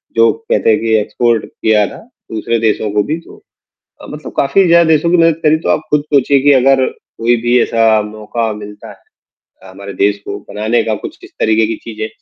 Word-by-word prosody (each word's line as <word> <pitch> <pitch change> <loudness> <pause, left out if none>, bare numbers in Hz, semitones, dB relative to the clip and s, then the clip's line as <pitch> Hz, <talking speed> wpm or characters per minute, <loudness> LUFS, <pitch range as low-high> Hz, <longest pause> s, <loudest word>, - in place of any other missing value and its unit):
जो 115 0 +4 0.2
कहते - - +2
हैं 110 - +3
कि 115 -1 0
एक्सपोर्ट 115 +1 0
किया 105 -2 +1
था। - - -10 0.3
दूसरे 115 +1 -1
देशों 110 -1 0
को 105 0 +1
भी 155 +2 -3
तो - - -16 0.7
अ, - - -10
मतलब 150 0 -9
काफ़ी 140 +8 +2
ज़्यादा 170 0 +5
देशों 160 +1 +2
की 180 - +4
मदद 165 -1 +2
करी 155 +1 +4
तो - - 0
आप - - +2
खुद 150 -1 +2
चाहिए 140 0 +3
कि 145 - +6
अगर, 135 0 +3 0.3
कोई 120 +1 +2
भी 120 +1 +3
ऐसा 115 -1 +2
मौका 110 +2 -4
मिलता 105 0 -10
है - - -12 0.7
अ, 95 - -13
हमारे 100 +1 -9
देश 100 0 +2
को 100 - -5
बनाने 110 +3 0
का 110 -1 -1
कुछ - - -8
किस - - -14
तरीके 110 0 +2
की 110 0 -3
चीज़ें, 110 -1 -5
115 Hz, 210 wpm, -14 LUFS, 105-140 Hz, 0.7 s, कि